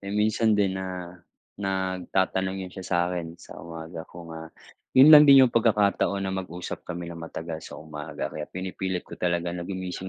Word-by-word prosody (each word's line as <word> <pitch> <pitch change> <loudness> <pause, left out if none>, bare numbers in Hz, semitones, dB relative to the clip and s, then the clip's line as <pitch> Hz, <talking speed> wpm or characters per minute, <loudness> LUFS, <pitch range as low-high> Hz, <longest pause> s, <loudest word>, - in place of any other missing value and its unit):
Eh, 100 - -8
minsan 105 +1 +2
din 100 -2 +2
na, 90 -2 -7 0.4
nagtatanong 95 0 -1
yun 90 - -10
siya 95 -2 -8
sa 85 - 0
akin, 85 -2 -5
sa - - -12
umaga 80 0 -8
ko 85 -1 -11
nga, 80 0 -8 0.5
yun 145 +4 +9
lang 150 -1 +10
din 135 -1 +9
yung 125 - 0
pagkakataon 105 -3 +2
na 95 - -2
mag-usap 90 -2 -5
kami 85 -1 -5
nang 85 - -9
matagal 80 0 -6
sa - - -10
umaga. 75 -2 -6
Kaya 75 -1 -5
pinipilit 95 0 -4
ko - - -10
talaga 85 -1 0
na 85 +1 -6
gumising 95 0 -5
95 Hz, 185 wpm, -26 LUFS, 85-100 Hz, 0.5 s, lang